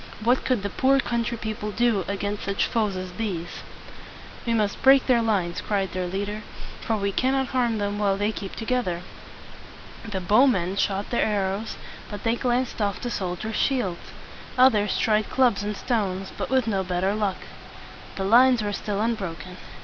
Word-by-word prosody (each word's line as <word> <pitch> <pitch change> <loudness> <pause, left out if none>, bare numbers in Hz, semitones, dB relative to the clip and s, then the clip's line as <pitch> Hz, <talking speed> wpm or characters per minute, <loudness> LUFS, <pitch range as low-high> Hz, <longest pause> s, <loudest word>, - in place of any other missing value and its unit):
What 245 +3 +3
could 250 -6 +1
the 200 - -3
poor 270 +1 +3
country 235 -2 -1
people 215 -1 -4
do 220 -2 +1
against 200 +1 -3
such 200 0 +1
foes 215 -4 0
as 185 0 -5
these? 180 -4 -4 0.9
"We 230 - +2
must 210 -2 0
break 270 0 +6
their 245 -2 +4
lines," 195 -7 0
cried 195 -3 -1
their 180 0 -2
leader; 205 +3 -3 0.4
"for 225 - -1
we 200 -1 -1
cannot 265 +3 +1
harm 240 -3 +1
them 205 0 -2
while 200 -2 +2
they 205 +2 +1
keep 200 -2 -7
together." 225 -7 -1 1.0
The 205 -4 -4
bowmen 195 -2 +3
shot 200 0 -1
their 240 - +2
arrows, 200 0 -1 0.3
but 205 - -7
they 230 -1 +2
glanced 245 -1 -1
off 200 -1 +1
from - - -11
the 245 - -2
soldiers' 195 +3 -3
shields. 225 -11 -1 0.5
Others 215 -6 +4
tried 215 -1 +2
clubs 245 -6 +3
and 205 0 -3
stones, 195 -5 -1
but - - -4
with 260 -2 +2
no 195 -4 0
better 185 +2 0
luck. 205 -3 -1 0.8
The 195 - -3
lines 240 +3 +5
were 205 -1 -2
still 205 0 -3
un 230 +1 +2
bro 190 -7 -4
ken. 180 +1 -10
210 Hz, 180 wpm, -25 LUFS, 195-235 Hz, 1.0 s, break